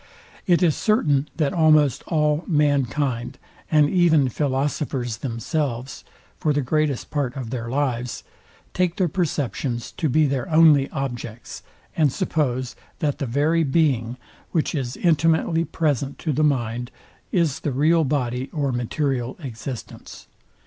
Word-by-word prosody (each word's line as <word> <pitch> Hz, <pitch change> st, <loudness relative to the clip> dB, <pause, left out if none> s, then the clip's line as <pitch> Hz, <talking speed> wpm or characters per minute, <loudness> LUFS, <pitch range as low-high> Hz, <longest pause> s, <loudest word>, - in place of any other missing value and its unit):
It 175 Hz, -2 st, +4 dB
is 160 Hz, -4 st, +3 dB
certain, 150 Hz, -, +1 dB
that 150 Hz, -4 st, +1 dB
almost 155 Hz, -5 st, +4 dB
all 150 Hz, -1 st, +1 dB
mankind, 140 Hz, -5 st, 0 dB, 0.3 s
and 150 Hz, -2 st, +4 dB
even 160 Hz, -5 st, +3 dB
philosophers 135 Hz, -3 st, -1 dB
themselves, 125 Hz, +1 st, -3 dB, 0.4 s
for 150 Hz, -, +1 dB
the 145 Hz, -1 st, 0 dB
greatest 150 Hz, 0 st, -1 dB
part 140 Hz, -3 st, -2 dB
of 120 Hz, -4 st, -5 dB
their 115 Hz, -2 st, -4 dB
lives, 125 Hz, -3 st, -2 dB, 0.5 s
take 180 Hz, -2 st, 0 dB
their 185 Hz, -, +1 dB
perceptions 145 Hz, -, -2 dB
to 160 Hz, -, -2 dB
be 155 Hz, +4 st, +3 dB
their 135 Hz, -3 st, -2 dB
only 155 Hz, -4 st, +5 dB
objects, 120 Hz, -4 st, -6 dB, 0.3 s
and 150 Hz, -4 st, +3 dB
suppose, 130 Hz, -8 st, -1 dB, 0.2 s
that 145 Hz, -2 st, -1 dB
the 140 Hz, -, -2 dB
very 150 Hz, +7 st, +2 dB
being, 135 Hz, -5 st, +1 dB, 0.3 s
which 160 Hz, -, 0 dB
is 130 Hz, -5 st, -3 dB
intimately 165 Hz, 0 st, +2 dB
present 145 Hz, -5 st, -1 dB
to 155 Hz, -, -2 dB
the 155 Hz, +4 st, +1 dB
mind, 120 Hz, -4 st, 0 dB, 0.4 s
is 165 Hz, -7 st, +1 dB
the 145 Hz, -, -2 dB
real 160 Hz, +5 st, +3 dB
body 130 Hz, -2 st, -1 dB
or 145 Hz, -3 st, -1 dB
material 125 Hz, +1 st, -2 dB
existence. 125 Hz, -1 st, -8 dB
145 Hz, 135 wpm, -23 LUFS, 125-155 Hz, 0.5 s, only